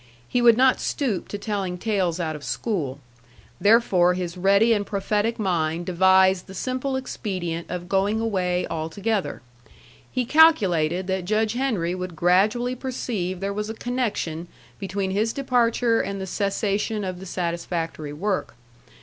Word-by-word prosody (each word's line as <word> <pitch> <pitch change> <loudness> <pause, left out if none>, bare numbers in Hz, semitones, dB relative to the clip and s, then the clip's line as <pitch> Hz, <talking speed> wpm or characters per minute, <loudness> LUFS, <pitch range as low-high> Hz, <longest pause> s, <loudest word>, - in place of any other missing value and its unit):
He 245 - 0
would 235 -2 +6
not 260 0 +4
stoop 240 -10 -2
to 205 - -5
telling 200 -4 -3
tales 185 -4 0
out 160 -2 -2
of 150 - -9
school. 155 - -2 0.6
Therefore 200 -5 +4
his 175 -1 -4
ready 200 +5 +4
and 205 -2 0
prophetic 210 +2 -1
mind 170 -4 -1
devised 190 +1 +4
the 190 - -10
simple 255 +6 -2
expedient 185 -10 -4
of 180 0 -5
going 195 +3 +1
away 185 -5 0
altogether. 185 - -2 0.7
He 255 -2 -1
calculated 190 - +4
that 190 -1 -2
Judge 215 +2 +1
Henry 225 -10 -1
would 185 -2 -5
gradually 210 +9 +2
perceive 225 -8 -4
there 200 0 -2
was 210 +1 -3
a 220 - -5
connection 215 -10 -2 0.3
between 195 0 -2
his 215 +3 0
departure 240 -3 +2
and 200 0 -4
the 190 - -4
cessation 200 +2 -1
of 185 -2 -4
the 190 - -9
satisfactory 170 -3 -3
work. 185 - -2
195 Hz, 145 wpm, -24 LUFS, 180-225 Hz, 0.7 s, would